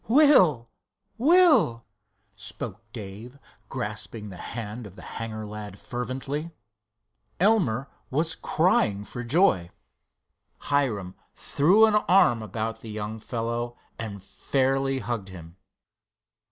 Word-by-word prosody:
"Will! 220 - +5 0.5
Will!" 305 - +5 0.5
spoke 105 - -6
Dave, 110 +4 -8 0.3
grasping 105 -2 -5
the 95 - -9 0.2
hand 110 0 -5
of 95 - -15
the - - -12
hangar 110 -1 -6
lad 105 -1 -8
fervently. 130 +7 -4 0.9
Elmer 170 - +2 0.2
was 160 +5 +1
crying 105 - +1
for 120 - -6
joy. 120 - +3 0.9
Hiram 115 -11 -1 0.2
threw 185 +10 +4
an 220 - +2
arm 180 - +4
about 110 +2 -4
the 115 - -9
young 105 +1 -5
fellow 120 +1 -3 0.2
and 100 -4 -6
fairly 135 +5 0
hugged 115 -5 -4
him. 85 -2 -11
120 Hz, 105 wpm, -26 LUFS, 105-145 Hz, 0.9 s, Will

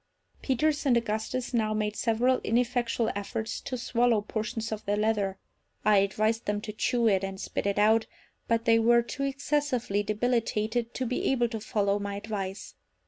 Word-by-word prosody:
Peters 295 +3 +1
and 245 -3 +5
Augustus 230 +3 -2
now 215 -2 +1
made 210 0 -1
several 240 +4 +2
ineffectual 240 -1 +1
efforts 220 +2 -4
to 255 - -4
swallow 235 -2 +2
portions 220 +2 -4
of 215 0 -4
the 205 +1 0
leather. 210 -3 0 0.5
I 210 -1 +5
advised 215 +3 +1
them 205 0 0
to 215 - -6
chew 235 +2 +1
it 195 -3 +3
and 195 0 -4
spit - - -3
it 200 - 0
out; 220 +2 +4 0.4
but 230 0 +1
they 230 0 +5
were 235 +1 +4
too 260 - -6
excessively 275 -6 0
debilitated 225 +1 -1
to 260 - -1
be 250 +1 -1
able 240 -3 +2
to 225 -1 -4
follow 205 -1 0
my 200 0 -4
advice. 200 -2 -5
225 Hz, 170 wpm, -28 LUFS, 210-240 Hz, 0.5 s, and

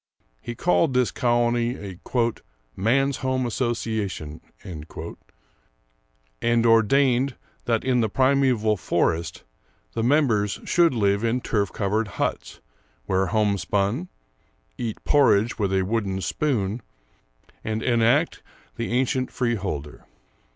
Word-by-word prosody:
He 120 - -6
called 165 -2 +2
this 125 -2 +2
colony 120 0 +1
a 95 -3 -8 0.8
"Man's 135 +7 +1
home 130 -1 -1
Association," 110 - -3 0.2
and 80 -4 -8 1.8
ordained 125 +3 +3 0.3
that 115 -2 +1
in 125 -2 +2
the 110 - +1
primeval 130 -4 +2
forest 85 -1 -1 0.5
the 115 - -2
members 115 -6 +2
should 170 -6 +3
live 100 -1 +1
in 115 +2 +1
turf 105 -5 -1
covered 105 +2 -1
huts, - - -3 0.4
wear 95 0 +1
homespun, 105 - 0 0.7
eat 115 -3 -4
porridge 120 -7 +3
with 100 -2 0
a 95 -1 +2
wooden 100 -2 -1
spoon, 115 -4 -1 0.8
and 110 0 -2
enact 120 +6 +2 0.4
the 115 0 -3
ancient 130 +1 0
freeholder. 95 - -3
115 Hz, 105 wpm, -24 LUFS, 100-130 Hz, 1.8 s, ordained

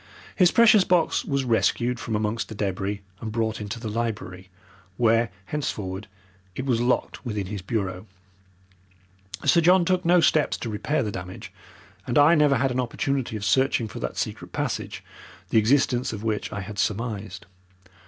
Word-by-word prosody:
His 180 -2 +5
precious 220 -2 +6
box 175 -3 +2
was 140 -1 -1
rescued 120 0 +1
from 115 - -3
amongst 105 +2 -2
the 110 - -7
debris 100 0 -2 0.2
and 110 - -5
brought 110 -1 -1
into 105 +3 -5
the 115 - -5
library, 105 -5 -4 0.5
where, 115 0 +3 0.2
henceforward, 105 -9 -4 0.5
it 130 - -4
was 120 -4 +1
locked 125 +1 0
within 105 -5 -3
his 100 0 -5
bureau. 95 -1 -3 1.4
Sir 170 +4 +5
John 180 +1 +5
took 185 +1 +1
no 175 +1 +5
steps 155 -2 +2
to 115 - -5
repair 145 +8 -1
the 105 - -3
damage, 90 -1 -8 0.5
and 120 - 0
I 145 +3 +7
never 150 -3 +4
had 130 +2 +1
an 125 - -1
opportunity 130 0 -2
of 105 - -5
searching 130 +1 +2
for 105 - -8
that - - -4
secret - - -4
passage, - - -3 0.5
the 115 - +4
existence 125 +2 +2
of 105 -1 -6
which 110 -2 -2
I 100 - -4
had 100 +1 -7
surmised. 105 -2 -3
115 Hz, 165 wpm, -25 LUFS, 105-135 Hz, 1.4 s, I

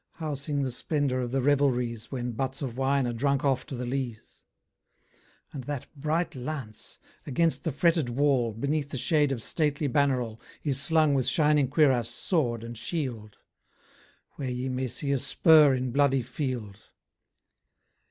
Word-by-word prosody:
How 155 -3 -4
sing 140 +1 -2
the 130 - -2
splendour 140 0 -1
of 125 -1 -2
the 130 +1 -1
revelries, 125 -5 +1
When 125 -2 -3
buts 130 +4 -3
of 125 -4 -4
wine 135 0 +1
are 120 - -2
drunk 140 +3 0
off 135 -2 +1
to 135 - -5
the 125 0 -4
lees? 125 -3 -5 1.1
And 130 -4 -6
that 145 -2 -4
bright 155 +4 -1
lance, 125 -4 -7 0.3
against 165 +4 +1
the 160 - -1
fretted 160 -1 +2
wall, 130 -2 +2
Beneath 140 +6 -2
the 135 - -4
shade 150 +2 +2
of 120 -4 -3
stately 150 -2 0
banneral, 125 -4 0 0.2
Is 140 -3 +1
slung 155 -1 +3
with 130 -3 +1
shining 150 0 +3
cuirass, 135 -6 +3
sword, 120 - 0
and 115 0 -7
shield? 120 -5 -4 1.0
Where 135 -3 -3
ye 125 +1 -3
may 130 0 -2
see 130 +4 -2
a 140 - +1
spur 150 +1 +5
in 130 -1 -2
bloody 135 -1 +2
field. 125 -6 -4
135 Hz, 160 wpm, -27 LUFS, 125-145 Hz, 1.1 s, spur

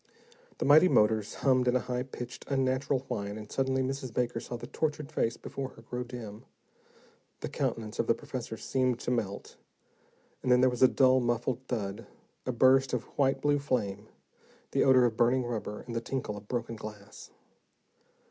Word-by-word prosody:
The - - -2
mighty 155 +5 +7
motors 105 - +3
hummed 130 -2 +4
in 125 - +3
a - - +4
high 125 0 -2
pitched, 125 -2 -7
unnatural 135 0 +1
whine, 105 -6 -4
and 105 -1 -9
suddenly 130 0 +1
Mrs. 130 -1 -3
Baker 120 0 -1
saw 120 - -6
the 120 - -8
tortured 150 +2 -2
face 115 -6 0
before 135 -1 -5
her 115 - -15
grow 125 +2 -4
dim. 115 -4 -8 1.0
The - - -3
countenance 110 0 -3
of 115 - +1
the 115 - +4
professor 130 -6 -6
seemed 130 0 0
to - - -2
melt, 100 -5 -3 0.8
and 125 - 0
then 125 - +6
there 130 0 +5
came 125 +1 +1
a - - +2
dull, 130 -1 +5
muffled 120 0 0
thud, 100 -5 -3 0.4
a - - +2
burst 130 +2 +4
of 125 -2 0
white 135 -1 +2
blue 145 0 +3
flame, 105 -7 -2 0.6
the - - +3
odor 130 -2 +6
of 115 -2 0
burning 125 +2 +3
rubber 110 -3 -4
and 120 -1 -7
the 115 - 0
tinkle 125 -4 -3
of 105 0 -10
broken 120 -1 -3
glass. 105 -2 -10
125 Hz, 180 wpm, -30 LUFS, 115-130 Hz, 1.0 s, mighty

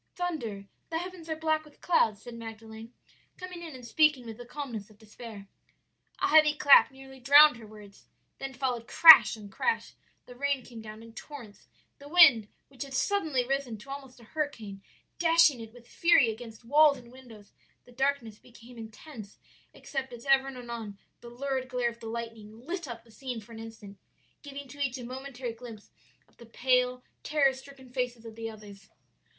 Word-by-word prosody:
"'Thunder; 245 - -4 0.2
the 325 - -2
heavens 350 -1 -7
are 315 - -1
black 315 0 0
with 300 -1 -20
clouds,' 220 - +1
said 240 - -9
Magdalen, 225 0 -10 0.5
coming 365 -1 -8
in 325 -5 -8
and 250 -2 -11
speaking 290 0 +2
with 225 -1 -8
the 245 - -10
calmness 240 -7 -6
of 215 - -20
despair. 215 -1 -11 0.7
"A - - +1
heavy 305 -1 +6
clap 285 -2 +7
nearly 265 0 -14
drowned 285 +1 +7
her 225 -2 -12
words, 210 -2 -15 0.3
then 270 -1 -6
followed 245 -2 -3
crash 320 -7 +9
on 205 -2 -11
crash; 455 - -2 0.3
the 245 - -13
rain 280 -1 -1
came 230 -2 -10
down 215 0 -10
in 230 0 -14
torrents 235 -6 -11 0.3
the 285 +1 -12
wind, 290 -11 +7 0.2
which 270 -2 -15
had 275 -2 -5
suddenly 315 -8 0
risen 270 -3 -2
to 235 +6 -12
almost 270 -2 -9
a - - -16
hurricane, 225 -8 -5 0.4
dashing 330 -5 +4
it 225 -1 -9
with 240 0 -17
fury 335 -9 +4
against 225 0 -11
walls 295 +3 +5
and 235 -1 -15
windows; 235 -6 -15 0.3
the 245 - -17
darkness 265 -4 -2
became 240 0 -15
intense 220 -1 -11 0.3
except 270 -2 -6
as 235 +1 -11
ever 270 -1 +4
and 270 -1 -7
anon 235 -4 -7 0.2
the 235 - -11
lurid 260 +1 -4
glare 250 -1 -1
of 235 - -16
the 225 - -9
lightning 225 0 -8
lit 340 0 -5
up 230 -2 -8
the 230 - -21
scene 250 0 -6
for 220 +2 -16
an 225 - -9
instant, 220 -3 -11 0.4
giving 280 -1 -9
to 285 +3 -13
each 270 -2 -1
a 250 - -8
momentary 255 -1 -6
glimpse 225 -3 -12 0.4
of - - -31
the 235 - -14
pale, 250 +1 +1 0.2
terror 285 -3 +2
stricken 265 -1 -14
faces 245 -2 -3
of 225 -1 -10
the 225 0 -5
others. 210 -2 -13
250 Hz, 185 wpm, -29 LUFS, 225-280 Hz, 0.7 s, crash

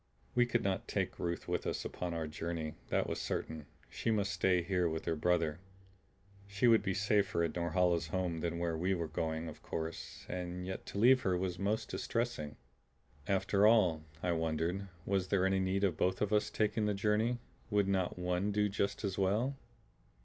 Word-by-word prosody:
We 120 - +4
could 120 -1 +1
not 100 +4 -1
take 95 -2 -2
Ruth 85 0 -2
with - - -1
us - - -2
upon 90 -2 -3
our 80 -1 -2
journey; 80 0 -4 0.2
that - - +2
was - - -2
certain; 75 -2 -3 0.2
she - - -3
must 105 -3 +1
stay 90 -2 +2
here 90 -1 +1
with 80 0 -4
her 80 - 0
brother. 85 -1 +1 0.9
She 100 +4 +2
would 115 -1 +6
be 95 -2 -1
safer 100 -4 +2
in 85 - 0
Norhala's 85 0 +1
home 90 0 -1
than 85 0 -2
where 85 -1 -1
we 90 +4 +1
were 85 -2 -2
going, 80 +1 -2
of 80 - -9
course, 80 -1 -5
and 90 0 -4
yet 95 0 -5
to - - -6
leave 130 +5 +6
her 95 -5 +1
was 90 -1 -2
most 105 +3 0
distressing. 115 -11 -2 0.7
After 100 +1 +3
all, 95 -9 +4 0.2
I 90 - +2
wondered, 85 +4 -1 0.2
was 95 -2 +1
there 95 -1 +2
any 95 0 +2
need 95 +1 0
of 90 -6 +2
both 95 +1 +1
of 105 0 0
us 105 - +3
taking 105 0 +1
the 105 - +1
journey; 110 +4 +1 0.3
would 105 -2 +2
not 95 -3 0
one 90 +3 0
do 105 0 +2
just 100 +1 -1
as 100 -1 -2
well? 110 +8 +1
95 Hz, 190 wpm, -34 LUFS, 85-100 Hz, 0.9 s, would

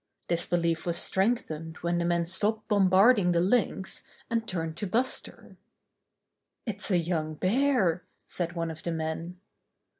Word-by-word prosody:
This 170 -1 +1
belief 170 -1 0
was 170 0 +1
strengthened 165 -7 0
when 175 0 +1
the 170 - 0
men 170 0 +1
stopped 210 +5 -1
bombarding 195 -1 +5
the 170 - +3
Lynx, 190 0 0 0.3
and 230 -1 0
turned 165 -3 -3
to 205 - -3
Buster. 245 +7 -3 1.1
"It's 210 -3 -2
a 185 - +3
young 160 -2 -1
bear!" 190 - +2 0.2
said 175 -1 -3
one 165 -1 -2
of 160 0 -9
the 170 - -3
men. 165 +2 -4
175 Hz, 145 wpm, -28 LUFS, 165-205 Hz, 1.1 s, bombarding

